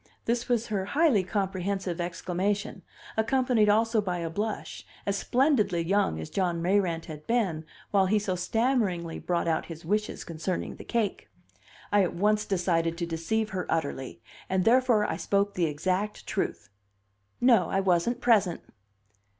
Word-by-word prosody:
This 235 +1 -1
was 235 -1 +1
her 195 -3 -1
highly 295 - +4
comprehensive 190 -2 -2
exclamation, 185 +4 -2 0.3
accompanied 230 -1 +2
also 225 +1 +3
by 180 -3 -2
a 165 -2 -3
blush 210 +4 -4 0.2
as 200 - 0
splendidly 215 - +2
young 180 - +1
as 80 - -7
John 180 -3 0
Mayrant 175 -2 +1
had 150 -1 -9
been 195 -10 0 0.3
while 195 -2 +4
he 215 +3 +3
so 205 -2 -1
stammeringly 190 -4 0
brought 175 -1 -1
out 160 -1 0
his 165 -1 -9
wishes 210 +4 -1
concerning 170 +2 -4
the - - -9
cake. 225 -4 -2 0.6
I 205 0 +5
at 180 - 0
once 210 +3 +2
decided 170 -3 0
to 170 - -2
deceive 170 +7 -1
her 185 -2 -3
utterly, 135 -7 -3 0.3
and 185 -1 +1
therefore 240 -3 +4
I - - -2
spoke 200 0 0
the 175 - +1
exact 185 +7 -2
truth: - - -3 0.7
"No, 240 -5 +4
I 195 - +1
wasn't 195 +6 +1
present." 205 -8 +3
195 Hz, 150 wpm, -28 LUFS, 170-215 Hz, 0.7 s, I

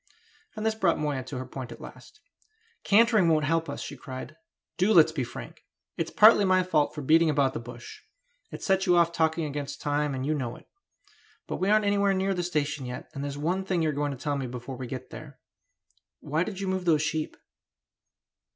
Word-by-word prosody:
And 215 0 -4
this 220 - +2
brought 190 -6 +1
Moya 145 -3 -2
to 130 0 -6
her 130 - -5
point 130 -1 -7
at - - -10
last. - - -13 0.6
"Cantering 215 -2 +4
won't 155 -2 +3
help 165 +2 0
us," - - -5
she - - -7
cried; 130 -1 -8 0.4
"do 195 +4 +4
let's 160 -1 +7
be 150 -5 -2
frank! 120 - -9 0.3
It's - - -2
partly 215 -1 +7
my 185 -1 +3
fault 155 -5 +1
for 150 - -5
beating 160 +3 +4
about 140 -3 +2
the - - -4
bush; 120 0 -10 0.5
it - - -9
set 190 -1 +1
you 175 -1 +5
off 170 -1 +4
talking 160 -1 0
against 145 -1 -5
time, 145 -1 -1
and 130 0 -3
you 155 - +1
know 125 -5 -3
it. - - -16 0.8
But - - -4
we 190 - 0
aren't 215 0 +4
anywhere 200 -1 +2
near 190 +1 0
the 180 - -2
station 150 -5 -2
yet, 125 - -7
and 140 - -5
there's 145 0 -4
one 175 +6 -1
thing 185 -3 0
you 155 - +2
are - - -1
going 145 +1 -1
to 140 - -5
tell 145 +2 -2
me 135 -2 -3
before 125 +2 -7
we 125 0 -6
get 130 0 -7
there. 140 -4 -10 0.8
Why 155 +4 -1
did 195 0 -6
you 195 - -3
move 185 -1 -2
those 155 -3 +3
sheep?" 155 0 -2
155 Hz, 215 wpm, -27 LUFS, 140-185 Hz, 0.8 s, let's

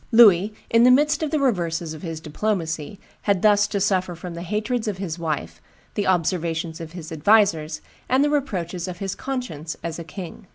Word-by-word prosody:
Louis, 210 -4 +7 0.2
in 230 +1 +6
the 250 - +7
midst 300 +4 +4
of 310 - 0
the 310 - 0
reverses 170 - 0
of 155 - -9
his 165 -3 -5
diplomacy, 160 0 -3 0.3
had 195 -2 +2
thus 205 -1 +5
to 205 -1 -2
suffer 185 -3 +1
from 175 +1 -7
the 170 - -6
hatreds 215 +5 -2
of 205 -3 -2
his 180 -3 -4
wife, 155 -3 -3 0.3
the 205 - -1
observations 170 -2 0
of 165 0 -8
his 170 -3 -8
advisers, 160 -3 +3 0.3
and 260 +2 +4
the 295 - +2
reproaches 185 - -2
of 180 -1 -5
his 195 0 -3
conscience 245 - -5
as 165 0 -4
a - - -5
king. 180 +1 -9
185 Hz, 195 wpm, -23 LUFS, 165-215 Hz, 0.3 s, Louis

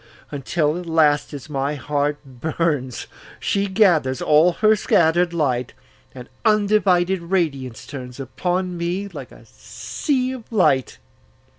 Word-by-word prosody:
Until 150 +3 -1
at 180 - -9
last, 155 -3 +2
as 145 -1 -8
my 140 0 -2
heart 145 +2 -1
burns, 135 -1 -2 0.3
She 200 0 0
gathers 175 - +2
all 155 +4 +4
her 215 +4 +3
scatter'd 175 -2 +2
light, 130 -7 -1 0.4
And 125 -1 -9 0.2
undivided 200 -4 +2
radiance 155 -9 -2
turnsUpon 140 +8 -4
me 180 +4 -2
like - - -9
a - - -16
sea 260 -4 -3
of 250 -4 -9
light. 160 - +2
165 Hz, 120 wpm, -21 LUFS, 140-190 Hz, 0.4 s, all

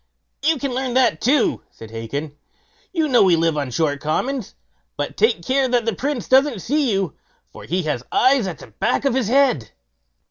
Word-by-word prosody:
"You 315 +2 +2
can 275 -1 -3
learn 255 -1 -2
that 255 -12 +3
too", 265 +2 +2
said 110 -1 -13
Hacon; 140 +7 -5 0.6
"you 325 -4 0
know 255 -4 +4
we 185 -3 +5
live 165 -1 +1
on 145 -3 -2
short 145 +2 0
commons. 245 - -2 0.4
But - - -3
take 445 - +1
care 265 0 +2
that 245 -2 +1
the 230 - 0
Prince 270 +3 -3
doesn't 265 -6 +3
see 285 -1 +1
you, 195 -6 -1 0.4
for - - -11
he 180 +3 -1
has 150 -6 -2
eyes 255 -5 +3
at 170 -5 -5
the - - -12
back 110 - -1
of 275 - +2
his 255 -4 0
head." 250 - +2
235 Hz, 190 wpm, -21 LUFS, -, 0.6 s, we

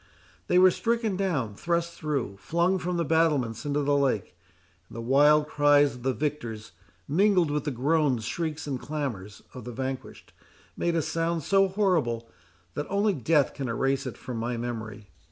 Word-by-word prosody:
They 180 - +3
were 185 0 +7
stricken 230 0 -1
down, 160 - -1
thrust 170 +7 -1
through, 140 -12 -3
flung 170 - 0
from 180 0 -2
the 170 - 0
battlements 145 -7 +1
into 145 0 0
the 145 0 +2
lake; 130 -10 0 0.5
and - - -13
the - - -5
wild 145 +5 +4
cries 145 -1 +4
of 125 - -11
the 130 +2 +1
victors, 120 -8 -4 0.4
mingled 180 0 +3
with 150 +1 -1
the - - 0
groans, 135 -2 +1
shrieks, 160 +1 -3
and 135 -4 -3
clamours, 120 -11 -5
of 125 - -9
the 125 - -7
vanquished, 130 +2 -6 0.4
made 170 -1 -1
a 165 - +1
sound 165 0 -1
so 195 +4 +3
horrible, 170 - 0 0.5
that 145 - -4
only 200 +1 +2
death 150 0 +2
can 135 -3 -4
erase 135 +4 0
it 125 - -6
from 125 -2 -6
my 120 +1 -2
memory. 110 -3 -6
145 Hz, 170 wpm, -27 LUFS, 125-170 Hz, 0.5 s, were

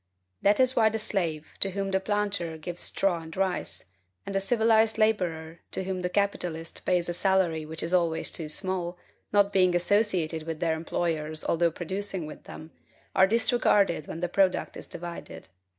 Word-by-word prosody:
That 205 +1 +4
is 260 0 +3
why 220 -2 +5
the 220 - -2
slave, 170 -8 -2
to 195 - +4
whom 195 0 -3
the 190 - +2
planter 200 -5 -1
gives 175 +2 -4
straw 180 -4 0
and 160 +1 -10
rice; 190 -1 -2 0.4
and - - -5
the 195 - +2
civilized 220 +1 +3
laborer, 175 -7 0
to - - -1
whom 185 -1 -3
the 180 - -1
capitalist 175 -4 -2
pays 180 -2 +2
a 175 - -2
salary 175 -4 +1
which 160 +1 -6
is 170 - -3
always 165 -2 +1
too 160 -2 -5
small, 180 0 -1 0.3
not 205 -1 +3
being 185 -2 +4
associated 175 -4 +1
with 160 -1 -4
their 165 -2 +1
employers, 160 -1 -2
although 170 0 +2
producing 190 +1 -4
with 150 - -10
them, 160 +1 -10 0.4
are 190 0 +6
disregarded 210 - +2
when 165 - -6
the 180 - +1
product 190 +1 +1
is - - -8
divided. 170 - -8
180 Hz, 175 wpm, -27 LUFS, 165-200 Hz, 0.4 s, are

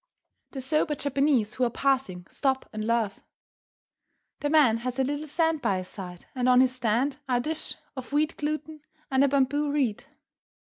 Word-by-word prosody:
The 270 - -4
sober 300 +3 +1
Japanese 275 -5 +1
who 255 - -1
are 245 - +3
passing 235 -9 0
stop 265 -2 -1
and 215 0 -3
laugh. 230 -4 0 1.2
The 290 - -1
man 290 -8 +5
has 250 +2 -4
a 265 - +2
little 290 +3 -3
stand 320 0 +1
by 200 -6 +1
his 185 0 -6
side, 180 -3 -9
and 255 -1 +1
on 250 - +6
this 255 0 +5
stand 255 +4 0
are 250 - +3
a - - +1
dish 315 +5 -2 0.2
of 260 0 -7
wheat 300 +2 +1
gluten 305 +1 -4 0.3
and 265 +1 +4
a - - +5
bamboo 280 +2 +1
reed. 265 -8 0
265 Hz, 180 wpm, -27 LUFS, 235-290 Hz, 1.2 s, on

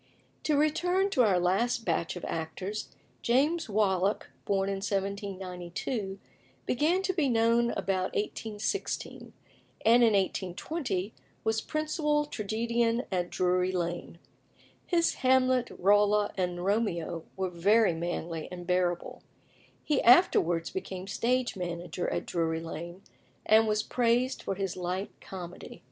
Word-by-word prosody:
To 300 -2 +2
return 355 +6 +2
to 260 - +3
our 200 -6 +4
last 225 +7 +1
batch 170 - 0
of 180 - -6
actors. 185 +6 -4 0.3
James 290 +5 +2
Wallack, 200 -1 +1
born 195 -1 +1
in 195 0 -1
1792, 195 +1 -3 0.5
began 325 +9 +1
to 375 - 0
be 310 -7 +1
known 230 0 +3
about 190 -1 -1
1816, 215 - -3 0.5
and 235 +2 +6
in 225 -2 +5
1820 195 - -1 0.3
was 220 0 +1
principal 305 -1 0
tragedian 230 0 0
at 180 -2 -1
Drury 180 0 +1
Lane. 175 -1 -3 0.7
His 335 -2 +2
Hamlet, 255 -1 +3
Rolla, 205 +2 +3
and 180 -1 -2
Romeo 175 -6 0
were 190 -1 -1
very 200 +3 +4
manly 165 -1 -4
and 175 -1 -7
bearable. 180 -1 -1 0.6
He 295 -3 +1
afterwards 175 - +5
became 190 -1 -5
stage 245 +4 0
manager 175 -1 -3
at - - -2
Drury 160 -1 -1
Lane, 170 +3 -7 0.4
and 220 +1 +5
was 215 0 +1
praised 245 +2 +1
for 195 - -3
his 195 -1 -3
light 185 +2 -3
comedy. 180 -2 -9
200 Hz, 125 wpm, -29 LUFS, 180-240 Hz, 0.7 s, and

